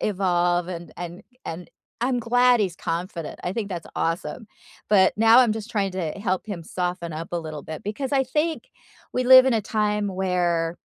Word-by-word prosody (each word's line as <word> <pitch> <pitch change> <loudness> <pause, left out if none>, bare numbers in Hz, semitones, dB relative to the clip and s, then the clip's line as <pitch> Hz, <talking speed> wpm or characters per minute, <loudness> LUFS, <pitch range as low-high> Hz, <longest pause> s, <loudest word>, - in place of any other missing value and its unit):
evolve, 175 -3 +1
and 175 -1 -7
and 175 0 -7 0.2
and 165 +1 -7 0.3
I'm 250 0 +1
glad 245 +1 +4
he's 185 -4 -1
confident, 170 0 -4
I 180 - -1
think 210 -2 -3
that's 175 -3 -6
awesome, 170 +7 -2 0.4
but 190 -3 +5
now 225 +2 +6
I'm 235 -4 +3
just 220 +1 -6
trying 195 -3 -1
to 170 -5 -3
help 195 -1 -2
him 185 -6 -5
soften 175 -1 -3
up 165 +2 -6
a 175 - 0
little 155 -2 -7
bit, 155 -1 -8
because 260 +7 -4
I 270 -1 +3
think 305 +5 -2 0.4
we 255 - 0
live 260 0 +9
in 265 - +2
a 225 - +2
time 210 -1 0
where, 175 -3 0
190 Hz, 185 wpm, -24 LUFS, 175-225 Hz, 0.4 s, live